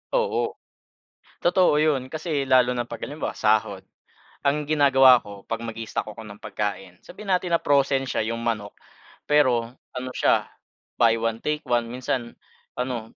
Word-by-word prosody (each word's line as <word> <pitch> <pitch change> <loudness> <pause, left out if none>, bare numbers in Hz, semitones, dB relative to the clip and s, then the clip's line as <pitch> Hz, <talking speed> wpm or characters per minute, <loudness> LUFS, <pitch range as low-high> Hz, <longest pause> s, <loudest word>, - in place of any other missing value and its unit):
Oo, 480 -1 0 0.9
totoo 180 -2 +4
'yon. 150 -4 +2
Kasi 155 -2 -3
lalo 130 -1 +4
na 120 -1 -2
pag 115 - -8
halimbawa 150 +2 -4
sahod. 105 -3 +1 0.6
Ang 145 +1 +1
ginagawa 135 -4 +6
ko 100 -1 -12
'pag 115 0 -3
mag-i-stock 115 -1 -4
ako 110 +1 -10
ng 105 0 -12
pagkain, 95 -4 -4
sabihin 195 +2 -8
natin 180 -2 +2
na - - -2
frozen 140 -1 +2
siya 130 - -2
'yong 115 +1 -3
manok. 110 -3 -2 0.5
Pero 125 -6 +2 0.2
ano 130 0 -4
siya - - +2 0.6
buy 115 -1 +5
one 115 0 -2
take 150 +3 -2
one, 120 -3 0
minsan 125 0 -3 0.4
ano, 125 -3 -4
125 Hz, 150 wpm, -24 LUFS, 115-145 Hz, 0.9 s, ginagawa